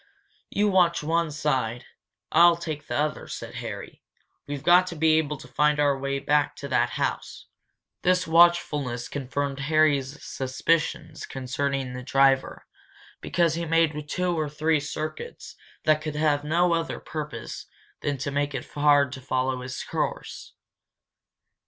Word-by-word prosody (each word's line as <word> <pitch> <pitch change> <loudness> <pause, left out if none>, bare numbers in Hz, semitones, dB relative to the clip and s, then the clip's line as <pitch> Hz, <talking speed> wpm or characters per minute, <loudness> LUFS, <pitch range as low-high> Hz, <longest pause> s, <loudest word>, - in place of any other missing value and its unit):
"You 210 +1 +1
watch 180 -5 +3
one 165 +1 +1
side. 135 -6 -1 0.5
I'll 170 +1 +7
take 155 -3 -6
the - - -3
other," 150 +1 -1
said - - -7
Harry. - - -7 0.5
"We've 145 -2 -5
got 180 +1 +6
to 175 - -5
be 160 0 +4
able 150 -1 -2
to 150 - -12
find 150 0 +2
our 145 -1 +3
way 140 0 -2
back 145 +1 +1
to 140 - -7
that 130 - +2
house." - - -3 0.6
This 180 0 +2
watchfulness 160 -7 +3
confirmed 140 0 -3
Harry's 145 -1 +1
suspicions 135 +5 -1
concerning 135 0 -2
the 125 - -6
driver, 135 +1 +2 0.6
because 170 -3 +1
he 170 +1 -2
made 155 -2 +1
two 180 0 0
or 155 -1 -1
three 155 +1 +1
circuits 155 - -6 0.3
that 155 0 +3
could 155 -1 -4
have 150 -1 +1
no 170 +3 +2
other 165 -1 -2
purpose 150 -7 -6 0.3
than 145 -1 -1
to 140 +2 -3
make 145 0 -1
it - - -4
hard 145 -2 +4
to 130 0 -7
follow 130 -1 -1
his 130 0 -5
course. - - -4
150 Hz, 145 wpm, -26 LUFS, 140-160 Hz, 0.6 s, I'll